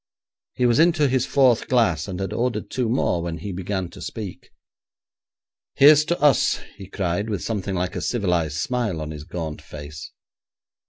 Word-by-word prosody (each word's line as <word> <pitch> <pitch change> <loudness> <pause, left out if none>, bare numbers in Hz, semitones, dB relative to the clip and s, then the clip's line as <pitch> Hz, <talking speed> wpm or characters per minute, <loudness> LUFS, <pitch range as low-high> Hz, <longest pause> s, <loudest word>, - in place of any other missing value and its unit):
He 125 - +1
was 120 -1 +3
into 160 -3 +4
his 130 -1 +1
fourth 130 -5 +3
glass, 105 -11 +2
and 95 -2 -5
had 95 -1 -3
ordered 120 -3 -2
two 125 -3 -1
more 100 -8 +1
when 85 -1 -4
he 100 +5 -6
began 95 0 -3
to 95 - -12
speak. 100 +1 -7 1.3
'Here's 150 +2 +7
to 170 +1 -1
us,' 145 -5 +3 0.2
he 95 - -10
cried, 95 +2 -2
with 100 -5 -3
something 100 -3 -3
like 90 0 -2
a - - -3
civilised 90 -9 0
smile 115 -2 -1
on 75 0 -5
his 75 -1 -8
gaunt 80 -3 -5
face. 75 0 -9
100 Hz, 170 wpm, -23 LUFS, 85-125 Hz, 1.3 s, Here's